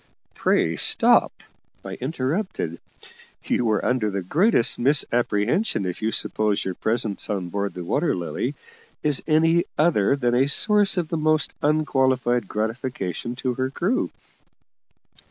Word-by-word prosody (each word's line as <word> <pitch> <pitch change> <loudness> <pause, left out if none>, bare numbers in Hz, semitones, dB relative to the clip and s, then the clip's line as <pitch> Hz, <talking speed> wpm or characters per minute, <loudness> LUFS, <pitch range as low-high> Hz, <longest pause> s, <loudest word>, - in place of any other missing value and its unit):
"Pray 80 0 +1
stop!" - - +4 0.5
I - - -6
interrupted. 130 - -3 0.6
"You 120 -2 0
are 105 -2 0
under 125 -4 +1
the 100 -2 -3
greatest 160 - +2
misapprehension 120 - +1
if 90 +2 -5
you 110 +1 0
suppose 105 -2 0
your 95 - -2
presence 110 0 -2
on 95 -4 -3
board 100 +2 -3
the 90 - -6
Water 145 - 0
Lily 90 - -3 0.5
is 150 -2 +3
any 165 +2 +3
other 140 - +3
than 120 -3 0
a 130 +3 +2
source 205 +5 +3
of 170 -3 -1
the 165 - -2
most 155 -1 +1
unqualified 130 -5 +1
gratification 110 -1 -4
to 130 0 -2
her 130 +1 -2
crew. 190 - -1
125 Hz, 135 wpm, -23 LUFS, 105-155 Hz, 0.6 s, stop